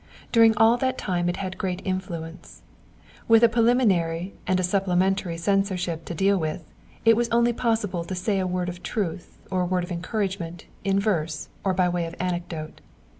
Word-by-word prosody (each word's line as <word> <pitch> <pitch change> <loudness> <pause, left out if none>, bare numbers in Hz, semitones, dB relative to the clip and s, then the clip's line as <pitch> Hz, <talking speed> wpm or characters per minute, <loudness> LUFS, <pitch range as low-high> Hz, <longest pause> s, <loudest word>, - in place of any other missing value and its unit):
During 225 -2 +5
all 225 +2 +5
that 260 +1 -1
time 175 -2 -1
it 175 - -2
had 185 -1 -5
great 185 -2 -2
influence. 180 -3 -5 0.6
With 225 0 +6
a - - +9
preliminary 200 -7 +2
and 185 0 +2
a - - 0
supplementary 185 -1 +1
censureship 180 -2 0
to 170 - -5
deal 195 +3 +2
with, 160 +1 -3 0.4
it 225 0 +7
was 235 +1 0
only 235 +1 +3
possible 220 -7 -1
to 185 - -4
say 195 +2 0
a 185 - 0
word 180 0 -1
of 175 0 -6
truth 180 -6 -4
or 185 -1 +1
a - - +1
word 180 0 0
of 175 - -7
encouragement 175 -2 -3 0.2
in 195 0 +2
verse 165 -7 -1
or 190 -2 +1
by 180 0 +3
way 175 -1 -1
of 165 - -8
anecdote. 175 -3 -4
185 Hz, 180 wpm, -25 LUFS, 175-210 Hz, 0.6 s, a